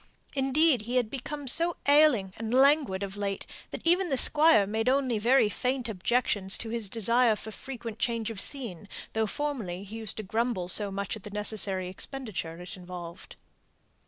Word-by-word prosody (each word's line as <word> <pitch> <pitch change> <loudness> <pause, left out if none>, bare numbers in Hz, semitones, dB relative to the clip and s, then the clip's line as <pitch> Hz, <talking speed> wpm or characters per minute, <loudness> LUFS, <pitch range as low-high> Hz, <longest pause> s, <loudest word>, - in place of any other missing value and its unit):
Indeed, 270 0 +2
he 240 +4 -5
had 240 -3 +1
become 280 +2 -6
so 335 +6 +3
ailing 285 -10 +4
and 225 0 -5
languid 270 -8 +3
of 195 0 -6
late, 200 -1 -3 0.2
that - - -8
even 355 +2 +2
the 270 - 0
Squire 295 -8 +6
made 220 +4 -1
only 260 -4 +1
very 240 +2 +4
faint 250 +3 -2
objections 205 -1 0
to 225 - -6
his 225 -3 -1
desire 230 +2 +3
for 220 +1 -9
frequent 230 -2 -8
change 230 -2 -1
of 200 -3 0
scene, 210 - -3 0.2
though 220 0 0
formerly 215 -10 -4
he 210 +3 -9
used 220 -2 -3
to 215 - -4
grumble 220 -3 -2
so 205 +1 +4
much 200 +1 -4
at 215 - -10
the 210 - -9
necessary 205 -2 0
expenditure 185 -5 -5
it 180 +4 -8
involved. 180 -2 -10
225 Hz, 175 wpm, -28 LUFS, 200-265 Hz, 0.2 s, Squire